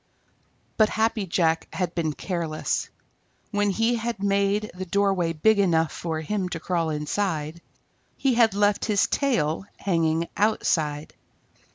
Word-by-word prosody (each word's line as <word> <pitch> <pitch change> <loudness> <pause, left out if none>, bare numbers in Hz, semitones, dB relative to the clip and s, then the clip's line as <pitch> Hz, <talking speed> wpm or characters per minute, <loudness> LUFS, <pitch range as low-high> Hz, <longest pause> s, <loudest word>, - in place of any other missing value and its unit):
But 215 -1 +5
Happy 220 -2 0
Jack 165 -2 +1
had 180 -2 -2
been 160 -3 -1
careless. 165 -2 -2 0.6
When 205 -1 +1
he 225 +4 +1
had 230 +1 -3
made 200 +1 +1
the 185 +1 -6
doorway 195 -3 +1
big 205 +7 +3
enough 165 -5 +2
for 160 -2 -4
him 185 +3 -2
to 165 - -4
crawl 170 -1 -1
inside, 155 +1 -2 0.6
he 270 -2 +2
had 230 -4 +4
left 205 0 +2
his 210 -3 +2
tail 190 - 0
hanging 165 -3 0
outside. 155 -8 0
185 Hz, 135 wpm, -25 LUFS, 160-205 Hz, 0.6 s, But